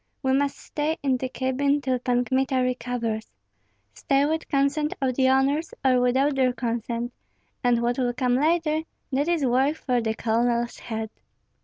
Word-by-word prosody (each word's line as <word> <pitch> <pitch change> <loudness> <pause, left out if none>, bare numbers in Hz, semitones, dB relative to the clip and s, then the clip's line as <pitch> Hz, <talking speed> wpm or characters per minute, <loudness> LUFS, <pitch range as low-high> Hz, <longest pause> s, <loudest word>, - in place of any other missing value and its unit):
We 265 0 +2
must 280 +1 +1
stay 305 +2 -2
in 265 -2 +2
the 255 0 -3
cabin 270 +3 0
till 260 -3 -1
Pan 245 0 +1
Kmita 260 0 +1
recovers, 245 -3 -2 0.6
stay 275 - +1
with 320 +2 -2
consent 280 +1 +1
of 265 -2 0
the 260 +1 +3
owners 275 +4 +1
or 255 -1 +4
without 260 +4 +2
their 260 -2 +2
consent; 235 0 -3 0.5
and 240 -1 +2
what 240 +2 0
will 245 -1 +1
come 250 0 0
later, 310 +3 +2 0.3
that 280 +3 +1
is 335 -5 +1
work 265 +4 +2
for 250 -5 0
the 220 -1 -1
colonel's 235 +1 0
head." 220 -1 -5
260 Hz, 165 wpm, -25 LUFS, 245-280 Hz, 0.6 s, or